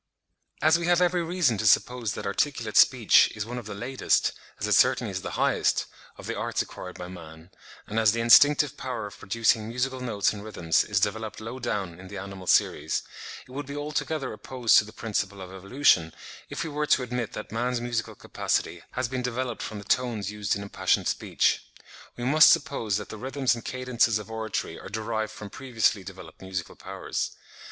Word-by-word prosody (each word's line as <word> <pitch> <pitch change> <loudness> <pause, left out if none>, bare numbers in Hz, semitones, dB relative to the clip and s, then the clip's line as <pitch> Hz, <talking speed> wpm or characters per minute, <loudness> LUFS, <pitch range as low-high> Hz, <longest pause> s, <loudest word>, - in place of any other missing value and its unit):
As 160 +2 +5
we 170 - -2
have 175 0 +4
every 180 0 +2
reason 165 - +1
to 110 - +1
suppose 120 +1 +2
that - - -6
articulate - - -1
speech - - +6
is 105 -1 -3
one 120 +2 -5
of 115 - -10
the 105 - -6
latest, 130 +5 +1 0.3
as - - -1
it - - -2
certainly - - +4
is - - -4
the - - -6
highest, - - +2 0.3
of - - -10
the - - -3
arts - - -1
acquired 90 - -9
by 90 - -7
man, 80 -1 -12 0.3
and 110 +2 -2
as 110 -2 +5
the 115 - -2
instinctive 145 +5 +6
power 125 -5 -4
of 100 - -10
producing 110 +1 +1
musical 130 +2 -2
notes 115 -6 0
and 105 -1 -8
rhythms 85 -7 +1
is 100 -2 0
developed 110 +2 -2
low 115 +4 -7
down 100 -8 -3
in 95 - -10
the 100 +1 -8
animal 95 -1 -8
series, - - +2 0.4
it - - -16
would 140 +1 -6
be 140 +1 -6
altogether 145 -2 -2
opposed 120 +2 +3
to 105 - -2
the 110 - -11
principle 105 -3 -3
of 95 0 -9
evolution, 95 - +2 0.3
if - - -3
we 165 - -4
were 150 +1 -1
to 130 - +3
admit 125 -2 -3
that 105 - -7
man's 120 +2 -1
musical 120 -1 -3
capacity - - -2
has 125 -1 -1
been 130 +1 -3
developed 125 -1 -3
from 110 - -5
the 100 - -8
tones 110 -4 0
used 105 -1 -1
in 100 - -5
impassioned 100 - 0
speech. - - +1 0.5
We 120 - -5
must 150 +5 +7
suppose 110 -8 +1
that - - -7
the 110 - -7
rhythms 130 +2 0
and 120 -1 -6
cadences 125 -3 +1
of 105 +1 -8
oratory 110 -1 -3
are - - -9
derived 110 0 -3
from 105 -2 -9
previously 115 -6 0
developed 95 0 -11
musical 95 -2 -5
powers. - - -4
115 Hz, 200 wpm, -27 LUFS, 100-130 Hz, 0.5 s, must